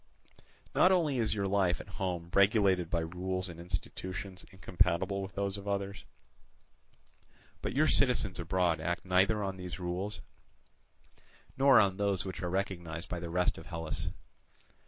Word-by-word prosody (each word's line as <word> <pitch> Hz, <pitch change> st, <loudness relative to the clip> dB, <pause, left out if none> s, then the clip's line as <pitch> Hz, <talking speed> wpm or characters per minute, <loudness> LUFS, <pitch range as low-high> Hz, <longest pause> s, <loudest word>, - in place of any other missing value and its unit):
Not 185 Hz, -, +5 dB
only 155 Hz, -8 st, +2 dB
is 110 Hz, -2 st, +1 dB
your 100 Hz, -1 st, -1 dB
life 95 Hz, -2 st, +2 dB
at -, -, -9 dB
home 85 Hz, -2 st, -2 dB
regulated 100 Hz, -4 st, +4 dB
by 85 Hz, -1 st, 0 dB
rules 90 Hz, +2 st, -3 dB
and 85 Hz, -1 st, -9 dB
institutions 90 Hz, +2 st, -5 dB
incompatible 95 Hz, +1 st, 0 dB
with 95 Hz, 0 st, -7 dB
those 100 Hz, 0 st, -1 dB
of 100 Hz, -, -10 dB
others, 100 Hz, -2 st, -3 dB, 1.6 s
but -, -, -3 dB
your 150 Hz, +3 st, +4 dB
citizens 125 Hz, -11 st, +3 dB
abroad 85 Hz, -2 st, +1 dB
act 85 Hz, +3 st, -2 dB
neither 95 Hz, +3 st, +3 dB
on 95 Hz, -1 st, -3 dB
these 90 Hz, 0 st, -6 dB
rules 90 Hz, +4 st, -3 dB, 1.3 s
nor 135 Hz, -1 st, +6 dB
on 95 Hz, -2 st, +3 dB
those 100 Hz, -3 st, 0 dB
which 95 Hz, -, -5 dB
are 90 Hz, -, -2 dB
recognized 85 Hz, -2 st, -3 dB
by 90 Hz, -, -3 dB
the 85 Hz, -1 st, -5 dB
rest 90 Hz, +1 st, +1 dB
of 80 Hz, -, -12 dB
Hellas. 80 Hz, -3 st, -4 dB
95 Hz, 150 wpm, -32 LUFS, 85-100 Hz, 1.6 s, nor